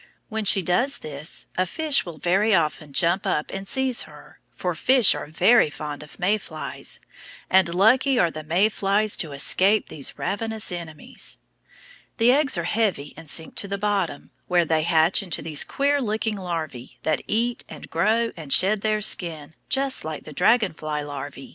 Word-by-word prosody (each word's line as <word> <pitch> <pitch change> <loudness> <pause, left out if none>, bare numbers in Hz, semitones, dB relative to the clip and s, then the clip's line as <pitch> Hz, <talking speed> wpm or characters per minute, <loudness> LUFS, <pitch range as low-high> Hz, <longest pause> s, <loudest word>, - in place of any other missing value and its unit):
When 220 -1 -3
she 195 -1 +4
does 245 - +1
this 150 +2 -4
a 185 - +2
fish 300 - +1
will 165 -3 -8
very 195 +6 +2
often 155 -3 -1
jump 175 +5 +2
up 150 - -1
and 195 0 -6
seize 265 0 +2
her, - - -16 0.2
for 180 -1 -2
fish 250 +7 +5
are - - -6
very 180 +5 +4
fond 150 -1 -7
of 150 - -13
May 205 +4 +1
flies, 155 -5 -7 0.5
and 185 -2 +3
lucky 250 +7 +4
are 175 -6 +3
the 155 - -7
May 175 +7 +2
flies 205 0 0
to 160 -5 -3
escape 190 +9 +2
these 140 -3 -1
ravenous 220 +1 -2
enemies. 170 -3 -6 0.8
The 235 +1 +5
eggs 275 -5 +2
are 170 - -1
heavy 180 -6 -1
and 160 -1 -10
sink 160 +1 0
to 200 - -3
the 200 0 -3
bottom, 195 -7 -2 0.2
where 175 -1 +2
they 160 0 +1
hatch 165 +3 +3
into 185 -4 -3
these 155 -3 +2
queer 285 +1 0
looking 220 -1 -1
larvæ 165 -9 -5
that 155 - 0
eat 235 +2 0
and - - -10
grow 220 +7 +1
and 155 -5 -9
shed 195 +6 +4
their 215 0 0
skin 160 -7 -1 0.2
just 270 0 0
like 155 -1 -6
the 155 - -10
dragon 210 - +3
fly 150 -1 -4
larvæ. 145 -1 -8
185 Hz, 180 wpm, -23 LUFS, 155-215 Hz, 0.8 s, fish